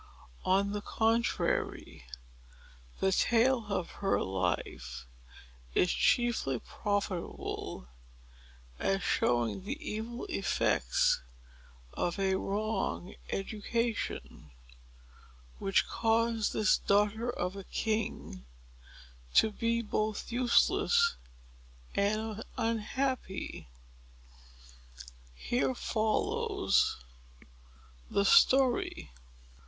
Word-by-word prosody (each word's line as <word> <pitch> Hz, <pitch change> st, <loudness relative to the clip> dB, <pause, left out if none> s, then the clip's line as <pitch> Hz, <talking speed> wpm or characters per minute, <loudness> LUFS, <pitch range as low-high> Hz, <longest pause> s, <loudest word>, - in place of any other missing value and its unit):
On 195 Hz, +2 st, +3 dB
the 205 Hz, 0 st, -3 dB
contrary, 225 Hz, -, 0 dB, 0.9 s
the 190 Hz, -, +2 dB
tale 235 Hz, +3 st, +3 dB
of 185 Hz, -4 st, -2 dB
her 195 Hz, -, +2 dB
life 75 Hz, -10 st, -3 dB, 0.7 s
is 180 Hz, -, +3 dB
chiefly 235 Hz, -, +2 dB
profitable 195 Hz, -, -4 dB, 0.9 s
as 195 Hz, -1 st, 0 dB
showing 120 Hz, -, +1 dB
the 245 Hz, +9 st, -4 dB
evil 235 Hz, -4 st, -5 dB
effects 60 Hz, -, +1 dB, 0.7 s
of 175 Hz, +2 st, -1 dB
a 195 Hz, -1 st, +1 dB
wrong 200 Hz, -1 st, -2 dB, 0.2 s
education, 215 Hz, -, -3 dB, 1.1 s
which 195 Hz, 0 st, +2 dB
caused 225 Hz, -1 st, +1 dB
this 210 Hz, -, +3 dB
daughter 210 Hz, +4 st, +2 dB
of 180 Hz, -5 st, -2 dB
a 195 Hz, -, -7 dB
king 185 Hz, -, -3 dB, 0.9 s
to 220 Hz, -, +6 dB
be 230 Hz, +2 st, 0 dB
both 215 Hz, +1 st, -2 dB
useless 255 Hz, -, +3 dB, 0.8 s
and 215 Hz, +2 st, -1 dB
unhappy. 230 Hz, -, -2 dB, 1.7 s
Here 245 Hz, -, 0 dB
follows 390 Hz, -, +1 dB, 1.1 s
the 200 Hz, -, +1 dB
story. 255 Hz, -, +4 dB
215 Hz, 75 wpm, -31 LUFS, 190-235 Hz, 1.7 s, to